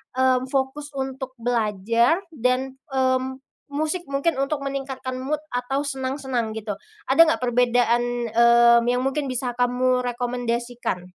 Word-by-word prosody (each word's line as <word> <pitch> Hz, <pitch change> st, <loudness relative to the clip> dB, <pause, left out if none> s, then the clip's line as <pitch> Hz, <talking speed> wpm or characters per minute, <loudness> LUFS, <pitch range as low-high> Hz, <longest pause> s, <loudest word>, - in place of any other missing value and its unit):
mmm, 260 Hz, 0 st, +2 dB
fokus 275 Hz, +2 st, -2 dB
untuk 265 Hz, -1 st, -4 dB
belajar 230 Hz, -, +1 dB
dan, 260 Hz, 0 st, -1 dB
mmm, 260 Hz, -1 st, 0 dB, 0.4 s
musik 310 Hz, +4 st, -1 dB
mungkin 280 Hz, +4 st, 0 dB
untuk 275 Hz, +1 st, -1 dB
meningkatkan 270 Hz, -2 st, -4 dB
mood 290 Hz, +3 st, -2 dB
atau 245 Hz, +3 st, -1 dB
senang-senang 265 Hz, -4 st, -2 dB
gitu, 215 Hz, -1 st, -4 dB, 0.4 s
ada 265 Hz, +5 st, +1 dB
nggak 320 Hz, -, +1 dB
perbedaan, 240 Hz, -1 st, +1 dB
mmm, 235 Hz, 0 st, +6 dB
yang 250 Hz, +1 st, +1 dB
mungkin 275 Hz, +1 st, -1 dB
bisa 255 Hz, -1 st, -2 dB
kamu 250 Hz, +1 st, +2 dB
rekomendasikan? 240 Hz, -4 st, -2 dB
255 Hz, 125 wpm, -23 LUFS, 240-270 Hz, 0.4 s, mmm